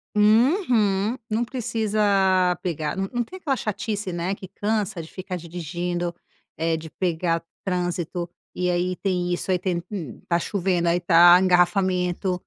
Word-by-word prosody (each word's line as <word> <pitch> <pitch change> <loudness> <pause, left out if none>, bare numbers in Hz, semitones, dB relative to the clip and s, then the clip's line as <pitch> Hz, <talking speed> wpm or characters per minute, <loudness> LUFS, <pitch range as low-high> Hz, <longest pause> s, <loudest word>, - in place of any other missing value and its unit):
Uhum! 220 - +3
Não 220 +3 +1
precisa 205 -6 +1
pegar 160 -3 -2
não 195 0 -2
não 240 -1 0
tem 370 - -10
aquela 285 -7 -1
chatice, 210 -4 -3
né, 175 +3 -1
que 190 - -10
cansa 205 -1 -2
de 160 - -12
ficar 185 -1 -6
dirigindo, 175 +1 -4 0.4
eh, 165 0 0
de 160 0 -9
pegar 170 -2 -1 0.2
trânsito. 175 -1 -2 0.3
E 180 0 0
aí 180 +1 0
tem 180 -2 -1
isso 180 +2 -2
aí 180 - +2
tem, 175 -2 -2
hum, 165 - -6
tá 170 - +3
chovendo, 180 -2 0
aí 170 +1 +3
tá 175 0 +7
engarrafamento. 180 0 +2
180 Hz, 150 wpm, -24 LUFS, 175-205 Hz, 0.4 s, tá